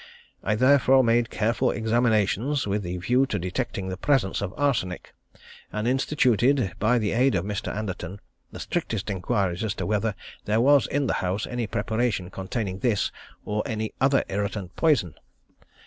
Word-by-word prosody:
I 110 - +1
therefore 130 +2 +5
made 115 0 +2
careful 115 +2 +1
examinations 115 +3 +1
with 100 +1 -1
the 90 -1 -4
view 125 +10 +2
to 105 - -2
detecting 95 +1 -3
the 95 - -4
presence 130 -9 +1
of 100 -2 -3
arsenic; 115 -11 -1 0.6
and 105 +2 -2
instituted, 130 - +2
by 115 +4 +3
the 105 -3 0
aid 125 -1 +3
of 90 0 0
Mr. 105 -1 -3
Anderton, 100 -2 -5 0.3
the - - -9
strictest 105 -1 -3
inquiries 95 -1 -1
as 110 -2 -2
to - - -3
whether 105 0 0 0.3
there 105 +2 +2
was 140 +3 +5
in 145 0 0
the - - 0
house 95 +3 -1
any 120 -2 -3
preparation 110 -3 -1
containing 95 0 -4
this 115 -4 +1 0.3
or 105 0 -1
any 110 -1 -3
other 135 +1 +4
irritant 100 -2 -3
poison. 145 - +2
110 Hz, 160 wpm, -25 LUFS, 100-125 Hz, 0.6 s, therefore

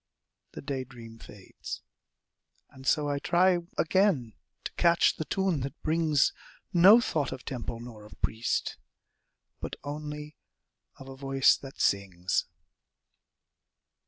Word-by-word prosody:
The - - -8
day 140 -2 -3
dream 115 -3 -12
fades 100 -4 -9 0.9
and 135 0 -12
so 150 0 +3
I 145 -1 -1
try 180 +3 +3 0.2
Again 165 - +2 0.3
to - - -4
catch 170 0 +3
the 155 - -3
tune 190 -4 0
that 135 +1 -5
brings 155 -3 +2 0.4
No 190 +6 +8
thought 155 - -1
of 130 - -8
temple 120 -3 -5
nor 115 -3 -10
of - - -16
priest, 110 +2 -1 0.8
But - - -5
only 150 +1 -6 0.6
of 135 - -12
a 135 - -9
voice 135 0 +3
that 135 -1 -11
sings. 95 -2 0
140 Hz, 125 wpm, -29 LUFS, 120-160 Hz, 0.9 s, No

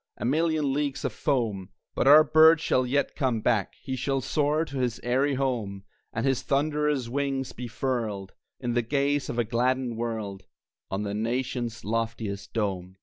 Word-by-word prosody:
A - - -4
million 155 +1 +1
leagues 145 -1 -2
of 130 - -1
foam!); 110 -11 -1 0.2
But - - 0
our 150 +2 +9
bird 160 +2 +6
shall 130 -5 +1
yet 140 +3 0
come 125 -5 0
back, 105 -3 0
He 130 - -3
shall 135 +2 0
soar 150 +4 +1
to 140 -3 -7
his 125 -3 -1
eyrie 135 +3 +1
home, 115 -8 -2 0.3
And 115 +3 -2
his 135 -1 +1
thunderous 145 0 0
wings 135 0 -2
be 125 - -6
furled, 110 -4 -3 0.3
In 120 -2 -2
the 120 - +2
gaze 140 +3 0
of 115 - -3
a 120 - +3
gladdened 120 +1 0
world, 110 -4 -4 0.5
On 95 +2 -2
the 100 -1 -3
nation's 120 +1 -2
loftiest 115 -2 -3
dome. 95 -4 -2
125 Hz, 170 wpm, -27 LUFS, 115-140 Hz, 0.5 s, our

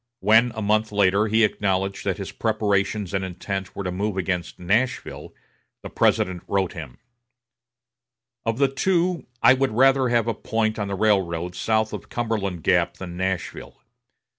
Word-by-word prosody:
When, 115 +3 +4
a 110 - -3
month 110 +1 +1
later, 100 +1 +3
he 110 +1 +3
acknowledged 95 -2 0
that - - -1
his - - -6
preparations 105 -3 -1
and 95 -1 0
intent 95 +1 -5
were 100 - -4
to 90 - -3
move 100 +2 -2
against 90 -2 -2
Nashville, 110 +9 -1 0.5
the - - -8
President 90 -2 +1
wrote 95 -2 0
him: 75 -8 -9 1.5
"Of 115 0 -1
the 140 0 +4
two, 175 +5 0 0.2
I 130 - +8
would 135 0 +1
rather 130 +1 +4
have 120 -1 +2
a 115 - +1
point 110 0 -1
on 100 - -2
the 100 - -3
railroad 90 -4 +1
south 110 +4 0
of - - -7
Cumberland 105 -8 -2
Gap - - +2
than 90 -2 -7
Nashville. 95 0 -4
105 Hz, 160 wpm, -23 LUFS, 95-115 Hz, 1.5 s, I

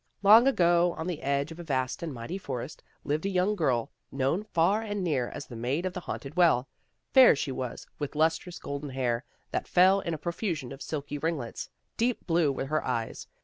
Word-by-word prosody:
" - - -41
Long 220 +5 +8
ago, 175 -7 +3
on 160 - -4
the 175 -4 -3
edge 140 +3 0
of 165 - -9
a - - -6
vast 130 -1 -1
and 170 -2 -3
mighty 130 +9 -5
forest, 135 -3 -6 0.2
lived 150 +2 -1
a - - 0
young 190 +2 +1
girl, 130 - 0 0.2
known 135 +7 0
far 195 +2 +2
and 205 -3 -3
near 140 -8 0
as 145 - -7
the 120 - -10
Maid 130 +9 -1
of 185 - -2
the - - -4
Haunted 150 -3 -6
Well. 165 -8 +4 0.5
Fair 260 - +8
she 140 - -3
was, 130 -2 -5
with 145 0 -4
lustrous, 165 +3 +1
golden 140 +1 -5
hair, 125 -3 -1 0.3
that - - -2
fell 185 +2 +5
in 170 -4 -3
a - - -6
profusion 170 - -3
of 135 +1 -9
silky 145 -1 -4
ringlets. 155 -6 -3 0.3
Deep 240 +1 0
blue 165 -4 +2
were 135 - -3
her 155 +3 -1
eyes. 115 -3 -3
155 Hz, 210 wpm, -28 LUFS, 135-180 Hz, 0.5 s, Long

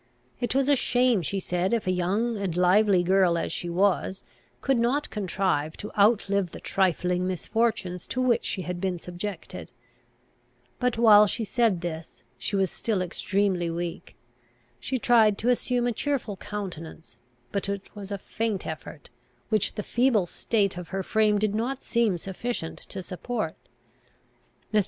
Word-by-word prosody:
It 245 +1 -1
was 275 0 +3
a 285 - +5
shame, 245 -4 +2
she 195 +5 -2
said, 180 +2 -1
if 230 - 0
a 185 - +1
young 200 +7 0
and 195 -5 -3
lively 185 +1 +4
girl, 185 -1 +3
as - - -2
she 175 - -3
was, 190 +1 +1 0.4
could 270 -3 +1
not 255 +5 +1
contrive 185 -6 -1
to 210 - -7
outlive 200 -3 +3
the - - -7
trifling 180 -1 +1
misfortunes 185 -1 -1
to 255 - -3
which 255 -2 +2
she 190 - -3
had 180 0 -4
been 185 -2 -1
subjected. 180 +4 -7 1.1
But, 250 -3 +1
while 210 -2 +7
she 225 - -2
said 220 -5 +1
this, 165 -2 -6 0.2
she 205 - -2
was 190 -1 +1
still 205 -5 -1
extremely 185 -1 0
weak. 170 0 -5 0.6
She 260 - -2
tried 225 -4 +4
to 235 - 0
assume 245 0 +1
a 245 - +2
cheerful 260 -5 -2
countenance; 180 -6 -7 0.3
but 200 0 -1
it 200 +1 -5
was 205 -1 -8
a 200 - -1
faint 215 0 -3
effort, 155 -1 -8 0.4
which 215 -3 +1
the 210 - -3
feeble 235 -5 +2
state 200 +1 0
of 175 - -8
her 195 0 -3
frame 215 +1 +2
did 210 0 0
not 250 +5 -2
seem 230 -6 +1
sufficient 190 0 -5
to 190 - -5
support. 180 -1 -4 1.2
Mr. 215 - +5
200 Hz, 160 wpm, -26 LUFS, 180-230 Hz, 1.2 s, while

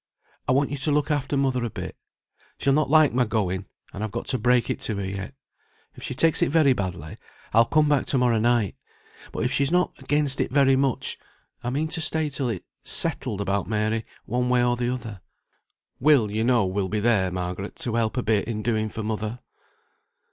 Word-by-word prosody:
I - - +2
want 140 +2 +2
you 145 - -2
to 140 +3 0
look 150 +1 +1
after 145 -1 -1
mother 130 -3 +1
a 120 - -2
bit. - - -7 0.6
She'll 135 - +2
not 155 0 +2
like 155 -2 +5
my 125 0 +3
going, 100 -4 -2 0.3
and 100 - -5
I've 110 - -2
got - - -5
to 130 - +2
break 125 +2 +3
it - - -3
to 110 - +1
her 100 -1 -3
yet. 100 +6 -6 0.6
If - - -14
she 130 - -5
takes 165 +4 +3
it - - +3
very 145 -3 +4
badly, 90 -8 -5 0.4
I'll 115 +2 +6
come 155 +4 +3
back 145 -3 +1
to 135 - +1
morrow 120 -3 +2
night; 115 -3 +1 0.6
but - - -3
if 125 - 0
she's 140 +1 +2
not 180 +1 +2
against 145 -2 +1
it - - -2
very 135 -1 +4
much, 135 -2 -1 0.4
I 120 - -2
mean 145 +5 -1
to 165 - -1
stay 160 -1 0
till 135 -3 -2
it's 105 -6 -5 0.2
settled 100 - +1
about 100 0 -1
Mary, 110 +1 0 0.2
one 125 +2 -1
way 125 -1 +3
or 120 0 +2
the 120 0 -1
other. 110 -6 -6 0.8
Will, 130 -7 +4
you 110 +2 -1
know, 120 -3 +3
will 95 0 -2
be 105 - -1
there, 105 -4 +2
Margaret, 90 +2 -5
to 120 - -3
help 115 +1 0
a 125 - 0
bit 110 -2 +1
in 110 -2 -3
doing 110 -2 0
for 110 - -5
mother." 110 +2 -4
120 Hz, 215 wpm, -24 LUFS, 105-135 Hz, 0.8 s, I'll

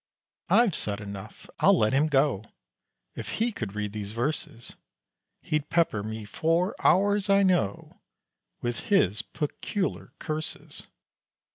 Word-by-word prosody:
I've 235 -6 +5
said 100 -7 -1
enough 100 -2 -9
I'll - - +6
let 110 +3 +2
him 145 +3 +4
go! 135 -8 +2 0.7
If - - -6
he 230 +2 +1
could 110 - -5
read 105 -1 -3
these 105 -1 -5
verses, 120 -1 -3 0.7
He'd 155 -1 -1
pepper 165 -11 +2
me 110 +1 -5
for 165 - +1
hours, 205 +2 +3
I 200 0 +5
know, 175 - 0 0.6
With 120 0 -1
his 105 - +3
peculiar 185 +6 -3
curses. 155 -1 -4
145 Hz, 125 wpm, -27 LUFS, 105-180 Hz, 0.7 s, I'll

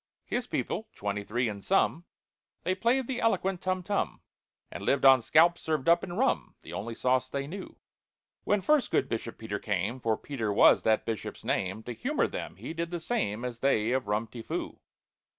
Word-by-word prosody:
His - - -2
people—twenty 100 0 -3
three 120 +4 0
in 100 -2 -5
sum— 175 - +1 0.6
They 185 - +1
played 235 +7 +1
the 250 0 -3
eloquent 195 -5 +1
tum 185 0 -1
tum, 200 +2 -1 0.5
And - - -7
lived 140 -1 +2
on 135 -2 +8
scalps 170 +8 +4
served 155 -3 -1
up, 170 +1 +5
in 175 - -5
rum— 260 +8 0
The - - -9
only 115 +2 -4
sauce 130 +1 +1
they 140 0 -3
knew. 185 +6 -8 0.7
When 205 -1 +2
first 290 +8 +3
good - - +1
BISHOP 115 -1 -4
PETER 105 -2 -4
came 105 +5 -2
(For 110 -3 0
PETER 115 -7 -3
was 100 - +6
that 110 -1 +2
Bishop's 110 -3 -4
name), 95 +4 -1
To 120 - -6
humour 270 - 0
them, - - -5
he - - -7
did 170 0 -3
the 175 0 -3
same 125 - -1
As 120 -2 -5
they 120 -4 +2
of 130 -4 0
Rum 105 +2 0
ti 115 +1 -9
Foo. - - -4
130 Hz, 190 wpm, -29 LUFS, 110-185 Hz, 0.7 s, on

